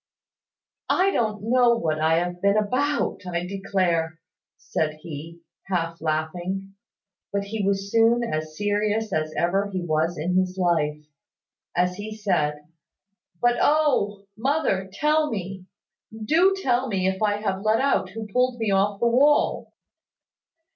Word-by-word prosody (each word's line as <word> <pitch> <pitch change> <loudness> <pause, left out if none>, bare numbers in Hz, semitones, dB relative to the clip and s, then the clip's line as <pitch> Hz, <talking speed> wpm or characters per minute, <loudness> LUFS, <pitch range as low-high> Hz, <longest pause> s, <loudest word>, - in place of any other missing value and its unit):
"I 380 +2 +3
don't 215 - -1
know 240 +1 +4
what 155 -7 -1
I 160 +1 +3
have 175 +1 -2
been 200 +1 +3
about, 260 +8 0
I 170 0 -2
declare," 180 -4 -1 0.4
said 155 -1 -2
he, 165 +2 -9 0.3
half 165 -3 -2
laughing. 175 +5 -3 0.6
But 200 0 -1
he 205 +1 -4
was 200 0 -1
soon 230 +1 +4
as 155 -7 -4
serious 210 +1 0
as 155 0 -1
ever 195 +4 +1
he 190 -2 -3
was 160 +1 0
in 180 +4 0
his 185 0 0
life, 165 -5 +1 0.8
as 180 +1 +1
he 215 +1 -6
said, 150 -8 -1 0.8
"But 240 0 +4
oh! 260 -10 +2
Mother, 225 -7 0
tell 300 +7 +1
me, 190 -3 -5 0.4
do 315 - +2
tell 255 -5 +1
me 190 -4 0
if 190 +1 -2
I 210 -1 +2
have 195 -2 -2
let 215 +2 +2
out 270 -8 +1
who 220 +3 -6
pulled 250 +3 0
me 225 -3 -1
off 200 +1 +1
the - - +1
wall." 280 +5 +3
195 Hz, 140 wpm, -24 LUFS, 175-225 Hz, 0.8 s, know